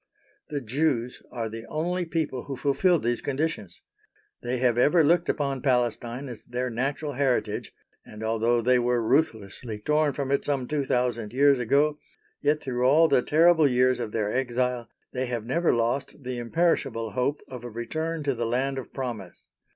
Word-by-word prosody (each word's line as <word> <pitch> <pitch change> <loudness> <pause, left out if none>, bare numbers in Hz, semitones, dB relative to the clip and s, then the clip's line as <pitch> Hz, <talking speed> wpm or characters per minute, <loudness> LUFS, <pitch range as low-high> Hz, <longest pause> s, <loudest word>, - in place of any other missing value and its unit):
The 145 -2 -3
Jews 125 0 -1
are 115 -2 -3
the 115 +1 -7
only 175 +3 -1
people 160 -6 -2
who 135 -2 -5
fulfil 170 +7 +3
these 120 -3 -1
conditions. 140 - -3 0.6
They 125 +1 -2
have 125 -2 +2
ever 150 +7 +4
looked 170 +4 +3
upon 140 -3 -1
Palestine 125 0 0
as 120 -4 -7
their 125 +1 -3
natural 140 +5 -2
heritage, 135 -2 0 0.3
and 105 +1 -10
although 115 +1 +1
they 125 +1 +4
were 120 0 +1
ruthlessly 110 -3 0
torn 150 +6 +1
from 140 -1 -3
it 140 - +1
some 135 -4 -1
two 150 -2 -1
thousand 120 -4 -1
years 140 0 +4
ago, 145 +5 +2 0.4
yet 150 +1 +1
through 125 -2 -2
all 155 +5 +5
the 135 - +4
terrible 160 +2 +5
years 125 -1 +3
of 110 - -4
their 105 -2 -1
exile 125 -2 -1 0.2
they 130 0 -2
have 120 -3 -3
never 165 +8 +2
lost 120 +4 -1
the 125 -1 -4
imperishable 120 -5 0
hope 125 +7 -1
of 125 -2 -8
a 120 - -6
return 155 +8 -3
to 140 -1 +1
the 120 -1 -2
Land 135 +3 0
of 130 - -9
Promise. 115 -9 -6
125 Hz, 175 wpm, -26 LUFS, 120-145 Hz, 0.6 s, all